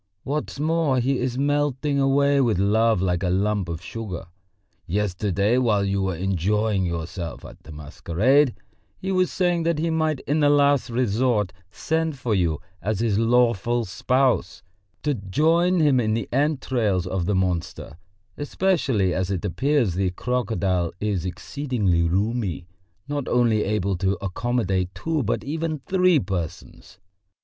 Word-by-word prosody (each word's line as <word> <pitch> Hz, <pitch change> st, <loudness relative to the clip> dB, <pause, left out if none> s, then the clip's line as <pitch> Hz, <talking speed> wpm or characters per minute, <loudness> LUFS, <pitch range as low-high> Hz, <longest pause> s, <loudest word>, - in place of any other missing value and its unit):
What's 145 Hz, 0 st, -3 dB
more, 155 Hz, -3 st, +1 dB
he 130 Hz, +2 st, 0 dB
is 125 Hz, 0 st, -2 dB
melting 145 Hz, 0 st, 0 dB
away 140 Hz, +1 st, +3 dB
with 115 Hz, -7 st, +2 dB
love 105 Hz, +1 st, +2 dB
like 90 Hz, -1 st, 0 dB
a 90 Hz, -, 0 dB
lump 100 Hz, 0 st, 0 dB
of 85 Hz, +1 st, -5 dB
sugar. 105 Hz, -7 st, -6 dB, 0.6 s
Yesterday 100 Hz, +3 st, 0 dB
while 105 Hz, -5 st, +2 dB
you 100 Hz, 0 st, 0 dB
were 95 Hz, -2 st, -1 dB
enjoying 95 Hz, +2 st, 0 dB
yourself 85 Hz, 0 st, -5 dB
at -, -, -12 dB
the 80 Hz, -, -13 dB
masquerade, 105 Hz, -, +1 dB, 0.4 s
he 190 Hz, -, -4 dB
was 185 Hz, -1 st, +2 dB
saying 175 Hz, -2 st, +1 dB
that 165 Hz, -1 st, 0 dB
he 165 Hz, +2 st, 0 dB
might 155 Hz, -3 st, 0 dB
in 150 Hz, +2 st, 0 dB
the 145 Hz, -1 st, +4 dB
last 145 Hz, -2 st, +3 dB
resort 115 Hz, -4 st, 0 dB, 0.2 s
send 160 Hz, +5 st, -2 dB
for 125 Hz, -3 st, -1 dB
you 85 Hz, -6 st, +1 dB, 0.2 s
as 105 Hz, -1 st, -1 dB
his 110 Hz, -3 st, +1 dB
lawful 120 Hz, 0 st, +2 dB
spouse 125 Hz, +1 st, 0 dB, 0.4 s
to 145 Hz, 0 st, +1 dB
join 160 Hz, -, +2 dB
him 145 Hz, -5 st, +4 dB
in 110 Hz, -2 st, +1 dB
the 115 Hz, -, -3 dB
entrails 130 Hz, -, 0 dB
of 90 Hz, -1 st, -2 dB
the 105 Hz, -, +1 dB
monster, 90 Hz, -4 st, -2 dB, 0.4 s
especially 145 Hz, -, +1 dB
as 95 Hz, 0 st, -1 dB
it 95 Hz, -1 st, -2 dB
appears 130 Hz, -, +1 dB
the 95 Hz, +1 st, 0 dB
crocodile 95 Hz, -5 st, -1 dB
is 100 Hz, -4 st, -1 dB
exceedingly 105 Hz, -4 st, -1 dB
roomy, 95 Hz, +1 st, -1 dB, 0.4 s
not 145 Hz, -2 st, -3 dB
only 115 Hz, -3 st, +2 dB
able 100 Hz, -2 st, 0 dB
to 95 Hz, +2 st, 0 dB
accommodate 95 Hz, -2 st, -1 dB
two 160 Hz, -2 st, -1 dB
but 115 Hz, -2 st, -1 dB
even 160 Hz, +2 st, -2 dB
three 185 Hz, -3 st, +3 dB
persons...." 90 Hz, -, -5 dB
115 Hz, 145 wpm, -23 LUFS, 95-140 Hz, 0.6 s, the